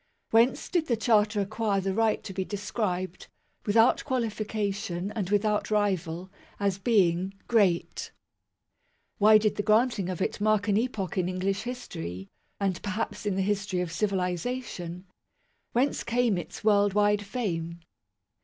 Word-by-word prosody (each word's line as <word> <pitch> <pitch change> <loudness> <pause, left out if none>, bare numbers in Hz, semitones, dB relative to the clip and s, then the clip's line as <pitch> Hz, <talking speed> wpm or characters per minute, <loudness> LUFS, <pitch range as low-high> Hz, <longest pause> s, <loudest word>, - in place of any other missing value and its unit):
Whence 230 +3 +3
did 340 -3 0
the 235 - +1
Charter 210 -2 +3
acquire 205 0 0
the 195 0 -1
right 225 +1 +1
to 195 - -7
be 190 0 -1
described, 190 -2 -3 0.4
without 225 +3 +4
qualification, 210 -6 -2
and 210 -4 -3
without 210 +1 +1
rival, 185 -4 -1 0.3
as 200 -1 0
being 190 -3 +2
" - - -36
Great 200 -7 +1 0.5
"? - - -46
Why 215 +1 +8
did 215 -1 0
the - - +1
granting 215 -2 +2
of 185 - -4
it 195 - -2
mark 215 0 +2
an 205 - +3
epoch 215 -7 -1
in 180 0 0
English 190 +2 -1
history, 95 - -6 0.3
and 195 -3 -1
perhaps 210 +1 -3
in 200 - 0
the 195 - +1
history 200 -2 -1
of 175 -2 -3
civilization? 180 -1 -2 0.7
Whence 260 +4 +1
came 240 -3 +1
its 175 - -6
world 205 -2 +3
wide 205 0 +3
fame 170 -6 -3
205 Hz, 145 wpm, -28 LUFS, 185-220 Hz, 0.7 s, Why